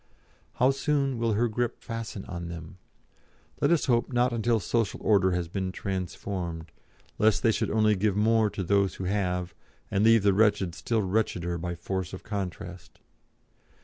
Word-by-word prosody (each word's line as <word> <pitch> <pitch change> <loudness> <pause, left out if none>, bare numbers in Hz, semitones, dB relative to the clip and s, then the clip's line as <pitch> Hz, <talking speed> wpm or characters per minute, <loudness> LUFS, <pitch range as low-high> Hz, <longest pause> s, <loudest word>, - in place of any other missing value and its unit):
How 130 +2 +3
soon 135 -2 0
will 115 -1 +1
her 115 +4 +2
grip 120 +1 -2
fasten 115 -4 -5
on 85 -2 -6
them? 85 +2 -9 0.8
Let - - +3
us 170 -2 +3
hope 120 -1 +1
not 125 0 +2
until 115 0 +1
social 115 +1 -1
order 95 -4 +4
has 90 -1 -1
been 95 +1 -3
transformed, 90 -3 -4 0.5
lest 110 -1 +3
they 115 - +5
should - - -1
only 110 -1 +3
give 100 0 +1
more 110 0 +3
to 100 - -4
those 100 +1 +2
who - - -6
have, 90 -2 -1 0.4
and 100 0 +2
leave 115 -1 +5
the 100 -1 +4
wretched 100 -4 +2
still 110 +4 -1
wretcheder 90 -3 -1
by 85 +1 -3
force 95 +1 -4
of 95 - -7
contrast. 90 -3 -6
100 Hz, 165 wpm, -27 LUFS, 90-115 Hz, 0.8 s, they